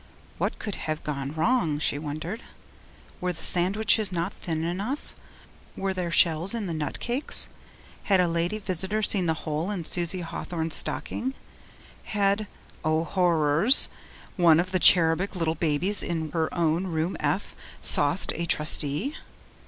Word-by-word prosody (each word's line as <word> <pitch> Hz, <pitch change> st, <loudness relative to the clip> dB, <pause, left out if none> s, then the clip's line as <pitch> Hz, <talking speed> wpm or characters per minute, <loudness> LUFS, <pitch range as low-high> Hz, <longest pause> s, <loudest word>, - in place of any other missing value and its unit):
What -, -, -1 dB
could 210 Hz, -, -5 dB, 0.2 s
have 155 Hz, 0 st, -3 dB
gone 140 Hz, -2 st, -4 dB
wrong, 165 Hz, -4 st, +1 dB
she 145 Hz, -1 st, -1 dB
wondered. 155 Hz, +8 st, -5 dB, 0.8 s
Were 180 Hz, 0 st, -1 dB
the 165 Hz, -, -8 dB
sandwiches 200 Hz, +3 st, +3 dB
not 175 Hz, +2 st, -2 dB
thin 160 Hz, -2 st, -4 dB
enough? 200 Hz, -, -4 dB, 0.6 s
Were 195 Hz, 0 st, -1 dB
there 180 Hz, -2 st, -3 dB
shells 170 Hz, +4 st, +2 dB
in 225 Hz, -3 st, -3 dB
the 170 Hz, -, -3 dB
nut 150 Hz, -3 st, -4 dB
cakes? 245 Hz, +4 st, +1 dB, 0.6 s
Had 195 Hz, -2 st, +3 dB
a 180 Hz, -, +3 dB
lady 170 Hz, +4 st, -1 dB
visitor 195 Hz, +1 st, -1 dB
seen 190 Hz, -4 st, 0 dB
the 160 Hz, -, +1 dB
hole 155 Hz, +4 st, -2 dB
in 185 Hz, -6 st, -4 dB
Susie 175 Hz, +2 st, -2 dB
Hawthorn's 165 Hz, -1 st, -4 dB
stocking? 260 Hz, +2 st, -1 dB, 0.7 s
Had 200 Hz, 0 st, 0 dB, 0.4 s
O 155 Hz, +1 st, +1 dB
horrors! 170 Hz, -, +3 dB, 0.5 s
one 170 Hz, -3 st, +5 dB
of 185 Hz, +2 st, -1 dB
the 185 Hz, -, +1 dB
cherubic 175 Hz, +3 st, +5 dB
little 165 Hz, -3 st, 0 dB
babes 165 Hz, +5 st, +2 dB
in 160 Hz, -3 st, -3 dB
her 160 Hz, 0 st, -1 dB
own 170 Hz, +2 st, 0 dB
room 165 Hz, +1 st, -2 dB
F -, -, -2 dB, 0.3 s
'sauced' 145 Hz, +5 st, +4 dB
a 170 Hz, 0 st, -4 dB
Trustee? 150 Hz, -, +1 dB
175 Hz, 145 wpm, -26 LUFS, 160-195 Hz, 0.8 s, one